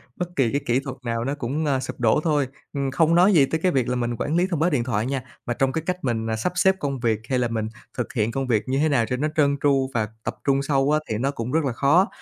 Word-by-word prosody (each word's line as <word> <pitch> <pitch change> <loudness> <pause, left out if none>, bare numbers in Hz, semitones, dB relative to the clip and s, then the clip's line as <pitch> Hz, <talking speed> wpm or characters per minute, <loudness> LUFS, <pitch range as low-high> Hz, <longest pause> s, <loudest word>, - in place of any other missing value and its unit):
bất 175 -1 -5
kỳ 125 -5 +2
cái 140 - 0
kỹ 120 +1 +2
thuật 135 -1 -7
nào 115 0 -1
nó 140 +3 -2
cũng, 140 +4 -2
a, 135 -3 +1
sụp 130 - -6
đổ 120 +4 +3
thôi. 145 -5 +1 0.3
Ừm, 140 -1 -1
không 160 +4 +3
nói 185 +4 +5
gì 145 -5 +6
tới 160 +3 -2
cái 185 - +3
việc 130 -4 +1
là 125 - 0
mình 120 -1 -1
quản 155 - -1
lý 180 +2 +3
thông 170 -5 -2
báo 170 +3 +3
điện 130 -7 +1
thoại 115 -2 -1
nha, 135 -1 -2 0.2
mà 120 - -1
trong 135 +2 +1
cái 160 - -2
cách 180 0 -1
mình, 115 -3 -1
à, 110 - 0
sắp 110 +11 -1
xếp 190 +1 +4
công 140 -3 -2
việc 115 -3 +1
hay 130 - +1
là 120 - +1
mình 110 -1 -2 0.3
thực 125 - -3
hiện 110 -1 0
công 135 0 -2
việc 110 -4 +2
như 130 - 0
thế 155 - +2
nào 120 -6 +2
cho 125 - -2
nó 150 - 0
trơn 140 -2 +3
tru 135 -2 +3
và 110 -2 0 0.2
tập - - -3
trung 140 0 +2
sâu 140 0 +1
á, 155 - +3
thì 110 - -1
nó 135 +4 0
cũng 120 -2 -5
rất 160 +2 +2
là 130 - -1
khó, 160 - +4
135 Hz, 310 wpm, -23 LUFS, 120-150 Hz, 0.3 s, gì